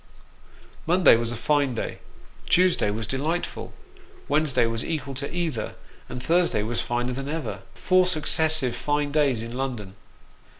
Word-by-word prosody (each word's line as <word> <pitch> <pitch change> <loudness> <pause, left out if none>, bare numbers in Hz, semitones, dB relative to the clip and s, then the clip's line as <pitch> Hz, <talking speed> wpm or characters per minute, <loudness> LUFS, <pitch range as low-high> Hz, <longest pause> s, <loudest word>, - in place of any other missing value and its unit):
Monday 175 -5 +6
was 115 0 -1
a - - -4
fine 140 +1 +1
day, - - -4 0.5
Tuesday 180 - +4
was 110 +2 -3
delightful, 150 +9 -3 0.6
Wednesday 150 -6 +2
was 115 0 -1
equal 145 -4 -3
to 135 +2 -5
either, 165 -10 -3 0.3
and 125 0 -6
Thursday 170 -8 +2
was 115 +2 -2
finer 120 +1 -2
than 135 +2 -5
ever; 155 -6 -4
four 185 0 +3
successive 155 -5 +2
fine 145 0 -1
days 140 -6 +2
in 115 +1 -7
London 120 -7 -4
135 Hz, 140 wpm, -25 LUFS, 120-160 Hz, 0.6 s, Monday